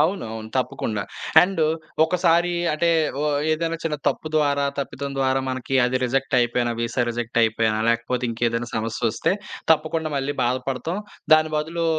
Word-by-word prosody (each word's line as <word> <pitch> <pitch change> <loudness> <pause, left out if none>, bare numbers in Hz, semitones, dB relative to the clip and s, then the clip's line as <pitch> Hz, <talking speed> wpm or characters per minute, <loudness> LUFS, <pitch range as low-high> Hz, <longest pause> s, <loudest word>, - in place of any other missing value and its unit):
అవును. 175 0 +1
అవును. 110 -1 -7
తప్పకుండా. 110 -4 -1 0.4
అండు 180 -3 +2 0.4
ఒకసారి 175 0 +2 0.2
అంటే 160 +3 +1 0.3
ఒ - - 0 0.3
ఏదైనా 165 +1 -1
చిన్న 155 -2 -1
తప్పు 155 - -3
ద్వారా, 140 -2 +2
తప్పితం 140 0 -4
ద్వారా 135 0 +2
మనకి 130 +1 -3
అది 130 - 0
రిజెక్ట్ 135 +2 0
అయిపోయినా, 120 0 +1
వీసా 120 +2 0
రిజెక్ట్ 120 0 -5
అయిపోయినా 110 -1 +1
లేకపోతే 115 +2 0
ఇంకేదైనా 115 +1 -1
సమస్యొస్తే 115 +4 0 0.4
తప్పకుండా 160 0 -1
మళ్ళీ 140 +1 -1
బాధపడతాం. 130 +7 -2 0.4
దాని 155 0 +2
బదులు 165 +2 -2
135 Hz, 140 wpm, -23 LUFS, 120-155 Hz, 0.4 s, అండు